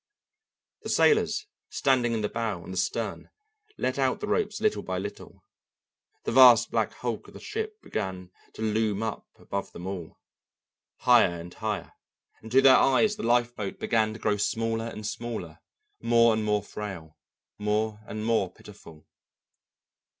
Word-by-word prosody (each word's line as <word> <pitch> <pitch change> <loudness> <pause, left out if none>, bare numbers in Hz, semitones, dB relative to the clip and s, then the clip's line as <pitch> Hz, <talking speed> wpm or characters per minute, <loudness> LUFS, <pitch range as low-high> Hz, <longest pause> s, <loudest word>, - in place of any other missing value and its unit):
The - - -7
sailors 440 -1 +3 0.2
standing 125 -3 +2
in 110 - -1
the 105 - 0
bow 110 -7 -3
and 95 - -8
the - - -5
stern 90 - -2 0.5
let 130 +2 -1
out 130 -1 +1
the - - -3
ropes 210 0 0
little 215 -1 +1
by 95 0 -4
little, 100 +2 -8 0.8
the - - -2
vast 120 -2 +7
black - - 0
hulk - - -4
of - - -15
the - - -9
ship 435 0 -5
began 95 -3 -4 0.2
to 110 - -6
loom 110 -1 0
up 110 -2 -4
above 100 0 -5
them 90 - -8
all, 95 -4 -6 0.8
higher 115 -9 +5
and 85 +1 -9
higher, 110 -2 -4 0.5
and 110 - -11
to 135 +2 +5
their 130 -1 +8
eyes 205 +11 +3
the 210 - -7
lifeboat 120 -4 0
began 110 -1 +1
to 110 - -9
grow 105 -1 +1
smaller 115 +2 -1
and 110 -2 -7
smaller, 110 -9 -5 0.4
more 115 0 +4
and 110 -1 -1
more 105 -1 +1
frail, 95 -7 -7 0.4
more 105 +1 -1
and 110 0 -5
more 110 -5 +1
pitiful. 80 -2 -15
110 Hz, 155 wpm, -27 LUFS, 100-120 Hz, 0.8 s, their